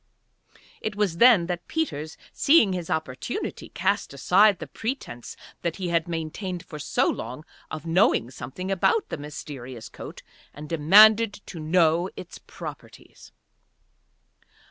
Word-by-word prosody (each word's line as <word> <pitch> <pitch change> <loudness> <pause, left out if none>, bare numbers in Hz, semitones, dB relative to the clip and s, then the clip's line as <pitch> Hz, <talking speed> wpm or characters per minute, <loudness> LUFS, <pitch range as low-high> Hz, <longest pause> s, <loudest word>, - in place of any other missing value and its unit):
It 215 -2 -3
was 200 -5 0
then 235 -6 +6
that 175 0 -5
Peters, 160 - -3 0.2
seeing 275 - +4
his 175 -3 -4
opportunity, 145 -5 -4
cast - - -1
aside 195 +7 +4
the - - -7
pretence 220 - -6 0.2
that 170 -2 -2
he 185 -3 -4
had 170 0 +1
maintained 170 +2 -4
for 155 -4 -9
so 145 - +1
long 130 +7 -4 0.2
of 155 0 -7
knowing 165 - +2
something 140 +10 -6
about 390 - +1
the - - -4
mysterious 130 -5 -8
coat, - - -10 0.3
and 150 +1 -8
demanded 205 +8 +6
to 170 - -8
know 165 +2 +2
its 180 - -10
properties. - - -11
170 Hz, 130 wpm, -25 LUFS, 150-195 Hz, 0.3 s, then